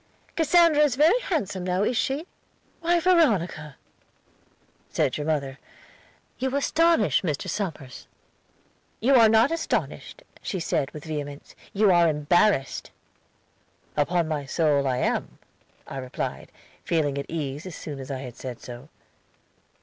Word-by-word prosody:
"'Cassandra 330 Hz, -1 st, +4 dB
is 290 Hz, -5 st, +3 dB
very 320 Hz, -, +4 dB
handsome 240 Hz, -, -2 dB
now, 180 Hz, +2 st, 0 dB
is 245 Hz, -, 0 dB
she?' 280 Hz, +6 st, -1 dB, 0.5 s
"'Why, 345 Hz, +1 st, +2 dB
Veronica,' 205 Hz, -, +2 dB, 1.1 s
said 140 Hz, -5 st, 0 dB
your 150 Hz, 0 st, -4 dB
mother, 140 Hz, -4 st, -2 dB, 0.8 s
'you 265 Hz, +1 st, -1 dB
astonish 330 Hz, -3 st, +3 dB
Mr. 155 Hz, -6 st, -3 dB
Somers.' 155 Hz, -10 st, -5 dB, 0.9 s
"'You 260 Hz, +5 st, +3 dB
are 230 Hz, -4 st, +7 dB
not 225 Hz, +6 st, +4 dB
astonished,' 330 Hz, +8 st, -3 dB, 0.2 s
she 190 Hz, -, -3 dB
said 150 Hz, -4 st, -1 dB
with 150 Hz, +1 st, -10 dB
vehemence, 145 Hz, -2 st, -6 dB, 0.2 s
'you 205 Hz, -1 st, +3 dB
are 170 Hz, -2 st, +5 dB
embarrassed.' 150 Hz, 0 st, +1 dB, 1.1 s
"'Upon 165 Hz, +3 st, +1 dB
my 150 Hz, -3 st, -3 dB
soul 145 Hz, -3 st, +2 dB
I 130 Hz, -1 st, 0 dB
am,' -, -, -1 dB, 0.5 s
I 135 Hz, -, -8 dB
replied, 130 Hz, -1 st, -5 dB, 0.3 s
feeling 145 Hz, -4 st, 0 dB
at 140 Hz, -, -6 dB
ease 150 Hz, 0 st, -4 dB
as 180 Hz, -, -8 dB
soon 145 Hz, -3 st, -7 dB
as 135 Hz, -, -8 dB
I 135 Hz, -2 st, -4 dB
had 125 Hz, -3 st, -8 dB
said 125 Hz, -3 st, -7 dB
so. 125 Hz, +4 st, -10 dB
170 Hz, 135 wpm, -25 LUFS, -, 1.1 s, are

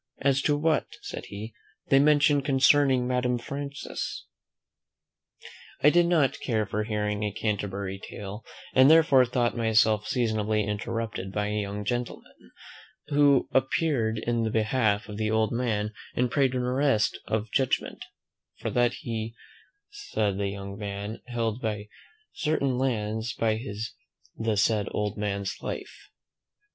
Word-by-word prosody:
"As 140 Hz, 0 st, +3 dB
to 145 Hz, +1 st, +2 dB
what," 160 Hz, +1 st, +1 dB, 0.2 s
said -, -, -6 dB
he, 105 Hz, +2 st, -7 dB, 0.4 s
"they 135 Hz, -, +6 dB
mention 145 Hz, 0 st, +4 dB
concerning 135 Hz, -1 st, +4 dB
Madame 125 Hz, -1 st, +1 dB
Frances 140 Hz, +3 st, -5 dB, 0.8 s
" -, -, -20 dB
I 150 Hz, -, +7 dB
did 175 Hz, +1 st, +4 dB
not 150 Hz, -6 st, +2 dB
care 110 Hz, -4 st, 0 dB
for 105 Hz, +2 st, -2 dB
hearing 105 Hz, -1 st, -1 dB
a 105 Hz, -1 st, -1 dB
Canterbury 100 Hz, -2 st, -3 dB
tale, 105 Hz, +2 st, -8 dB, 0.3 s
and, 130 Hz, +2 st, +7 dB
therefore, 155 Hz, -5 st, +6 dB
thought 120 Hz, 0 st, 0 dB
myself 110 Hz, -2 st, +3 dB
seasonably 110 Hz, -3 st, 0 dB
interrupted 105 Hz, -1 st, -3 dB
by 105 Hz, +1 st, -1 dB
a 105 Hz, 0 st, -1 dB
young 100 Hz, 0 st, -5 dB
gentleman, 120 Hz, +2 st, -5 dB, 0.6 s
who 145 Hz, -2 st, +4 dB
appeared 130 Hz, -4 st, +1 dB
in 120 Hz, +1 st, -1 dB
the 110 Hz, -, 0 dB
behalf 110 Hz, -1 st, +1 dB
of 105 Hz, -1 st, -7 dB
the 110 Hz, 0 st, 0 dB
old 110 Hz, 0 st, +2 dB
man, 110 Hz, -3 st, -1 dB, 0.2 s
and 125 Hz, -1 st, +1 dB
prayed 135 Hz, -3 st, +2 dB
an 125 Hz, -, 0 dB
arrest 125 Hz, -3 st, +1 dB
of 110 Hz, 0 st, -2 dB
judgment; 135 Hz, -2 st, 0 dB, 0.5 s
"for -, -, -4 dB
that 120 Hz, -1 st, +2 dB
he, 115 Hz, -4 st, -4 dB, 0.8 s
the 105 Hz, -2 st, +2 dB
said 95 Hz, -, -5 dB
young 100 Hz, 0 st, -4 dB
man, 100 Hz, +1 st, -5 dB
held 115 Hz, -1 st, -2 dB, 0.7 s
certain 150 Hz, -5 st, 0 dB
lands 110 Hz, -3 st, -1 dB
by 110 Hz, -1 st, +1 dB
his 110 Hz, -2 st, -5 dB, 0.4 s
the 110 Hz, -2 st, -1 dB
said 105 Hz, 0 st, +2 dB
old 105 Hz, 0 st, -1 dB
man's 100 Hz, -2 st, -3 dB
life." -, -, -7 dB
115 Hz, 140 wpm, -27 LUFS, 105-130 Hz, 0.8 s, I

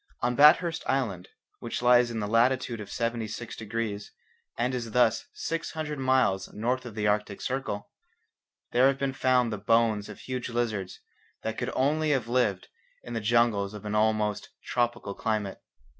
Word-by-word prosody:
On 125 Hz, -, +1 dB
Bathurst 160 Hz, +4 st, +5 dB
Island, 105 Hz, -10 st, -1 dB, 0.3 s
which 120 Hz, +1 st, -4 dB
lies 120 Hz, 0 st, +5 dB
in 115 Hz, -2 st, -3 dB
the 105 Hz, -, -2 dB
latitude 120 Hz, +1 st, +2 dB
of 105 Hz, -, -9 dB
76 115 Hz, -1 st, -3 dB
degrees, 110 Hz, -2 st, -4 dB, 0.5 s
and 125 Hz, +2 st, 0 dB
is 115 Hz, -3 st, -4 dB
thus 120 Hz, -3 st, +3 dB
six 165 Hz, +1 st, -4 dB
hundred 155 Hz, -2 st, -4 dB
miles 130 Hz, -7 st, +2 dB
north 125 Hz, +3 st, -1 dB
of 110 Hz, -, -9 dB
the 105 Hz, -1 st, -1 dB
Arctic 105 Hz, -1 st, 0 dB
Circle, 130 Hz, -6 st, -3 dB, 0.8 s
there 125 Hz, +2 st, +5 dB
have 135 Hz, 0 st, +2 dB
been 135 Hz, -1 st, -1 dB
found 125 Hz, -3 st, +2 dB
the 105 Hz, -, -4 dB
bones 110 Hz, 0 st, +2 dB
of 105 Hz, -, -10 dB
huge 130 Hz, -1 st, -4 dB
lizards 110 Hz, -6 st, -2 dB, 0.4 s
that 110 Hz, 0 st, -3 dB
could 120 Hz, -, -2 dB
only 150 Hz, +4 st, +1 dB
have 130 Hz, -6 st, +1 dB
lived 115 Hz, -6 st, +1 dB, 0.4 s
in 120 Hz, -, -7 dB
the 115 Hz, -, -2 dB
jungles 105 Hz, -3 st, +2 dB
of 105 Hz, -, -9 dB
an 105 Hz, -, -3 dB
almost 105 Hz, -1 st, +1 dB, 0.2 s
tropical 120 Hz, -4 st, -1 dB
climate. 105 Hz, -3 st, -2 dB
115 Hz, 165 wpm, -28 LUFS, 105-130 Hz, 0.8 s, Bathurst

